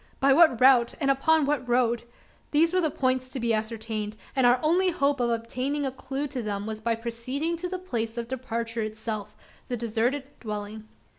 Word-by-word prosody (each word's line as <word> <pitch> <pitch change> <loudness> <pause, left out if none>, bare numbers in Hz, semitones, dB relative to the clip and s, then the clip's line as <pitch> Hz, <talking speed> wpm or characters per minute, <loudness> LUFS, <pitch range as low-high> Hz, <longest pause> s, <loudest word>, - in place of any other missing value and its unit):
By 275 0 +5
what 310 -6 +5
route? 250 -2 +5
and 275 -3 +3
upon 310 +3 +3
what 275 -3 -1
road? 240 -1 +2 0.4
These 330 +3 +3
were 370 - +3
the 315 - +2
points 255 -2 0
to 260 - -4
be 230 -1 +1
ascertained; 220 -1 -3 0.2
and 260 -2 +4
our 245 +1 +5
only 360 +4 +3
hope 280 -4 +1
of 240 -1 +1
obtaining 255 +5 -2
a 265 - -1
clue 270 +2 -4
to 260 -3 -3
them 205 -2 -3
was 220 0 -5
by 230 +1 +1
proceeding 245 +8 -3
to 360 +2 -4
the 370 - -3
place 235 -11 -3
of 235 -1 -3
departure 235 -2 -3
itself 215 -1 -4 0.3
the 245 - -2
deserted 235 +4 0 0.2
dwelling. 210 0 -6
245 Hz, 195 wpm, -27 LUFS, 225-280 Hz, 0.4 s, By